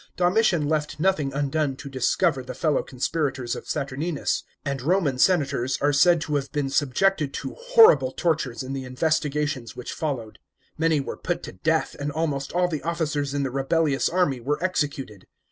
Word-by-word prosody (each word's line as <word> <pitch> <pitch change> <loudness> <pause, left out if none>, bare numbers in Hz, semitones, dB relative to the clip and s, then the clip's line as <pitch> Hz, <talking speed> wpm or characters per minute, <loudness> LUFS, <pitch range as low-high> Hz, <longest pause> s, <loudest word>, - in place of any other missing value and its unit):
Domitian 180 -3 +2
left 150 -1 -1
nothing 155 -6 +1
undone 140 0 -1
to 140 +1 -10
discover 135 +3 +1
the 125 - -8
fellow 155 -5 +1
conspirators 135 -1 -2
of - - -9
Saturninus, 145 +2 -2 0.2
and 140 -2 -2
Roman 150 -3 +1
senators 140 -7 +2
are 145 +1 +2
said 170 +4 +5
to 150 -2 0
have 140 -1 -4
been 145 -3 -2
subjected 145 +2 +1
to - - -5
horrible 460 - +5
tortures 140 -7 -1
in 130 +1 -5
the 135 -1 -4
investigations 145 -2 -1
which 125 - -6
followed. 130 -9 -4 0.4
Many 160 -1 +2
were - - -6
put - - -3
to - - -6
death, 160 - 0
and 145 +1 -2
almost 145 -3 -2
all 180 +1 +2
the 155 -4 -3
officers 155 -4 -2
in 140 - 0
the 135 - -2
rebellious 140 +2 +1
army 175 -8 +1
were 140 +5 -1
executed. 140 - -2
145 Hz, 170 wpm, -24 LUFS, 135-165 Hz, 0.4 s, said